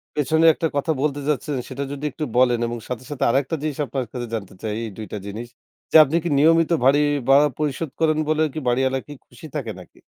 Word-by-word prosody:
পেছনে 160 +2 +2
একটা 165 - -1
কথা 145 +3 0
বলতে 145 -1 0
যাচ্ছেন। 150 0 -1
সেটা 135 +2 -4
যদি 145 +1 -5
একটু 155 - -4
বলেন 125 -2 +4
এবং 120 0 -4
সাথে, 125 -1 -5
সাথে 145 - -3
আরেকটা 135 +5 +1
জিনিস 150 -3 -3
আপনার 130 -2 -3
কাছে 120 -2 -5
জানতে 100 -4 -6
চাই। 110 -2 -3
এই 115 - -4
২ 110 - -6
টা - - -2
জিনিস 110 +4 -6 0.4
যে - - -3
আপনি 150 +2 -2
কি 175 - -1
নিয়মিত 165 +2 +4
ভারী 140 +3 +5 0.3
ভাড়া 145 +2 +6
পরিশোধ 150 +1 -2
করেন 155 -1 +2
বলে 155 0 +2
কি 155 - -3
বাড়িওয়ালা 130 +2 +1
কি 145 - -8
খুশি 125 +6 -14
থাকে 120 -7 -3
নাকি? 90 - -16
140 Hz, 220 wpm, -22 LUFS, 125-155 Hz, 0.4 s, ভাড়া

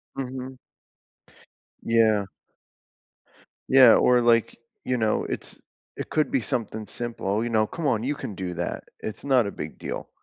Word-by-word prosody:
Mhm. 130 -1 -6 1.2
Yeah. 110 -3 +3 1.4
Yeah, 130 -3 +8
or, 125 0 +5
like, 120 -1 +2 0.3
you 125 - 0
know, 110 -2 +1
it's - - -6 0.4
it - - -6
could 155 -1 0
be 130 - +1
something 110 -4 -3
simple, 115 -3 -3
you 120 - -2
know? 110 -1 +2
"Come 165 - -6
on, 110 -2 +1
you 145 +3 -1
can 125 -7 -6
do 90 -2 -5
that, 85 +1 -3 0.2
it's 110 -1 -6
not 130 -4 +3
a - - -4
big - - -7
deal." - - -6
115 Hz, 155 wpm, -25 LUFS, 110-130 Hz, 1.4 s, Yeah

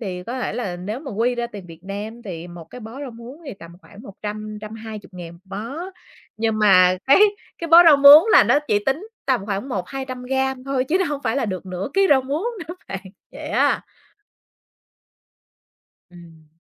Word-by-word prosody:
thì 185 -5 -5
có 240 +7 -5
thể - - -2
là 195 -8 -4
nếu 205 +8 -5
mà 290 - -9
quy 230 +4 0
ra 240 0 -2
tiền 200 -5 -10
Việt 165 +1 -14
Nam 210 +4 -7
thì 175 -5 -7
một 175 -1 -10
cái 250 - -10
bó 230 +5 -9
rau 280 -3 -6
muống 240 +7 -12
thì 270 - -6
tầm 170 -3 -13
khoảng 205 +2 -15
100.000-120.000 215 -4 -8
một 170 - -17 0.2
bó, 230 +7 -6 0.6
nhưng 220 -1 -1
mà 185 -3 +5
cái 275 - +6 0.4
cái 335 - -5
bó 335 +2 +9
rau 315 -4 +8
muống 285 +5 +9
là - - +8
nó - - +4
chỉ 205 - +3
tính 305 +11 -1 0.2
tầm 250 -7 0
khoảng 200 +5 -3
100-200 255 +4 -5
gam 265 0 -1
thôi 270 -2 -1
chứ 305 +7 0
nó 380 - +1
hông 290 -4 -3
phải 225 - 0
là 275 - 0
được 190 -3 -5
nửa 185 +3 -4
ký 390 0 +4
rau 270 -2 +5
muống 290 - -3 0.2
nữa 345 - -6
bạn, 195 - -5 0.3
vậy - - -8
á. - - +1 2.3
Ừm. 165 -3 -16
225 Hz, 195 wpm, -21 LUFS, 195-265 Hz, 2.3 s, bó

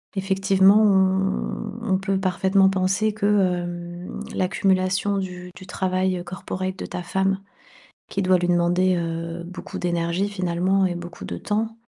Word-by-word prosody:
Effectivement 195 +1 +4
on 190 -1 +3 0.6
on 190 - +3
peut 195 0 -1
parfaitement 190 +1 +3
penser 195 +3 +1
que, 210 -1 -3
hem, 175 -3 -1 0.2
l'accumulation 190 +1 +1
du 180 -1 -5
du 185 - -11
travail 185 0 -1
corporate 185 +1 -5
de - - -5
ta 180 - -5
femme, 190 +2 0 0.7
qui 195 - -1
doit 185 -1 +4
lui 175 0 -1
demander, 175 +1 +3
heu, 165 0 -4
beaucoup 180 +2 -8
d'énergie 175 +2 0
finalement 185 0 +1
et 175 - -2
beaucoup 175 0 -8
de - - -5
temps, 220 +2 -2
185 Hz, 140 wpm, -23 LUFS, 180-195 Hz, 0.7 s, Effectivement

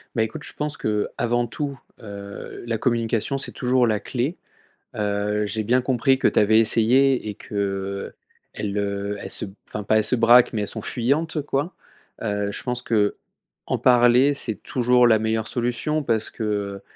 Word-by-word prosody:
Bah, 110 - +2
écoute 110 - -5
je - - -9
pense 150 0 -2
que, - - -5
heu, 105 -1 0
avant 120 0 +1
tout, 140 +3 -5 0.2
heu, 100 -2 -9
la 115 -1 -2
communication 115 +2 0
c'est 135 - -3
toujours 125 -1 +1
la 110 -2 +1
clé. 135 +8 -3 0.6
Heu, 105 0 -1
j'ai 110 +2 -3
bien 125 +4 +2
compris 130 +1 +2
que - - +2
tu - - +2
avais 110 +1 +4
essayé 120 +2 +4
et 105 - -6
que, - - -13
heu, 100 -1 -3 0.4
elles 105 -1 -4
heu, 100 0 -2
elles - - -7
se - - +4
b 95 - -11
enfin, 105 - -5
pas 110 +2 +2
elles 110 - +2
se 115 - +6
braquent, 120 +1 +5
mais 110 - -1
elles 105 - -2
sont 110 - -2
fuyantes 150 +8 -1
quoi. 145 +4 -2 0.5
Heu, 105 -1 -1
je - - -7
pense 125 -1 -2
qu'en 105 -4 -3
parler 125 +3 +4
c'est 115 -6 -3
toujours 125 -1 +3
la 110 -2 +4
meilleure 110 0 -1
solution 125 +6 -1
parce 115 -6 -1
que, 115 - -6
heu, 100 -2 -3
115 Hz, 190 wpm, -23 LUFS, 105-125 Hz, 0.6 s, se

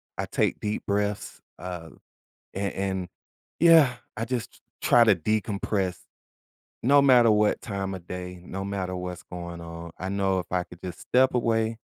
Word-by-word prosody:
I - - -3
take - - 0
deep 105 0 -3
breaths, 100 0 -1 0.2
uh, 90 -3 -7 0.7
and 100 +1 -2
and, 95 -2 -2 0.5
yeah, 160 -6 +7 0.2
I 115 - -1
just 120 -1 -3
t - - -21 0.2
try 120 -1 +6
to 105 -3 +6
decompress 100 0 -1 0.9
no 140 +3 +6
matter 125 -5 +6
what 105 0 +3
time 95 -2 -3
of 90 -1 -11
day, 90 0 -6
no 95 +1 -5
matter 95 -2 -3
what's 90 0 -5
going 85 -1 -7
on- 85 0 -8
I 95 +1 -4
know 95 -1 +1
if 90 - -4
I 90 -1 +1
could 90 0 -15
just 90 -2 -6
step 130 +1 +3
away, 115 -2 +1
100 Hz, 165 wpm, -26 LUFS, 90-110 Hz, 0.9 s, yeah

